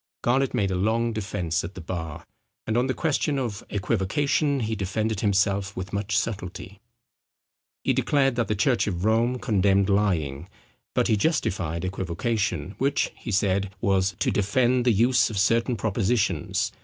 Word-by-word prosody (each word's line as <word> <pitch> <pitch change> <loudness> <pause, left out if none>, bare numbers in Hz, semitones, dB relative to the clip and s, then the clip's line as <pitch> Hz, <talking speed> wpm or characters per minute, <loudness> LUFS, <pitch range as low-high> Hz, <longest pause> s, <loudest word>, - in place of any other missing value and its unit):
Garnet 130 +2 +2
made 100 -5 +1
a - - 0
long 115 +5 +1
defence 90 -6 -2
at 85 +3 -7
the - - -7
bar; 80 -2 -6 0.4
and 110 - -1
on 125 +2 +2
the 130 - 0
question 150 -2 0
of 115 -7 -3
equivocation 140 - 0
he 110 0 -1
defended 105 +2 -2
himself 100 -1 +1
with 95 +2 -5
much 100 +1 -1
subtilty. 100 -3 -4 1.0
He - - +2
declared 135 -3 +2
that 120 -1 0
the 105 - 0
church 120 +3 +2
of 90 -1 -2
Rome 115 +3 +2
condemned 100 -4 +2
lying; 85 -6 0 0.5
but - - +2
he 110 - +3
justified 95 - -1
equivocation, 95 -1 -2
which, 140 +2 +1
he - - -8
said, 100 -1 +1
was 95 -1 +1
"to - - +1
defend 120 +5 +2
the 125 - +5
use 120 +4 +3
of 110 - -5
certain 115 +5 +2
propositions. 100 - 0
100 Hz, 155 wpm, -25 LUFS, 95-120 Hz, 1.0 s, the